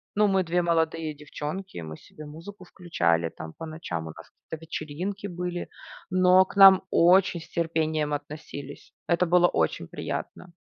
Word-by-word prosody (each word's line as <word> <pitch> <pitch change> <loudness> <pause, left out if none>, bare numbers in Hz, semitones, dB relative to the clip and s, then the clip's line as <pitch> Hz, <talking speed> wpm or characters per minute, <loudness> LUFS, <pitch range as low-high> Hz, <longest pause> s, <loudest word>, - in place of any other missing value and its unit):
Ну, 210 0 +4
мы 190 -1 +2
2 175 +1 0
молодые 165 -2 0
девчонки, 150 +6 -7
мы 80 -1 -8
себе 155 - -13
музыку 165 +6 -11
включали 85 - 0
там 80 0 -10
по 165 - -7
ночам, 155 - -5
у 80 - -8
нас 80 - -13 0.2
какие-то 160 - -4
вечеринки 175 +6 -5
были. 180 -1 -4 0.4
Но 185 0 +5
к - - -13
нам 195 -1 +9
очень 180 0 +4
с 160 - -14
терпением 160 -2 -1
относились. 145 -1 -8 0.2
Это 175 +1 +2
было 175 +1 +5
очень 80 - -1
приятно. 180 - -6
165 Hz, 160 wpm, -26 LUFS, 150-180 Hz, 0.4 s, нам